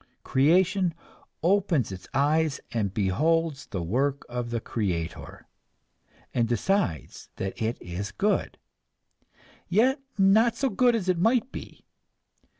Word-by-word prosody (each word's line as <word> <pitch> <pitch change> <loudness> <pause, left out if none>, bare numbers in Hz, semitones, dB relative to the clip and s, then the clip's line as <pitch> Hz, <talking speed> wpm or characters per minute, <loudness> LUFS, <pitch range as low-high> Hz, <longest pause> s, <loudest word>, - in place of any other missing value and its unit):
Creation 175 +5 +3 0.5
opens 175 - +2
its 95 0 -8
eyes, 150 +2 +1
and 105 -4 -1
beholds 150 - 0
the 95 -4 -4
work 135 +10 0
of 120 -1 -4
the 120 0 -1
creator, 90 -8 -4 0.9
and 120 -2 +1
decides 120 - -1
that 95 +3 -5
it 110 +2 -1
is 95 +3 -5
good 205 +2 0 1.1
yet 255 - +3 0.2
not 215 +4 +4
so 265 +1 0
good 245 +3 +3
as 200 -5 -2
it 180 -2 +1
might 235 +6 +2
be! - - -10
150 Hz, 120 wpm, -26 LUFS, -, 1.1 s, not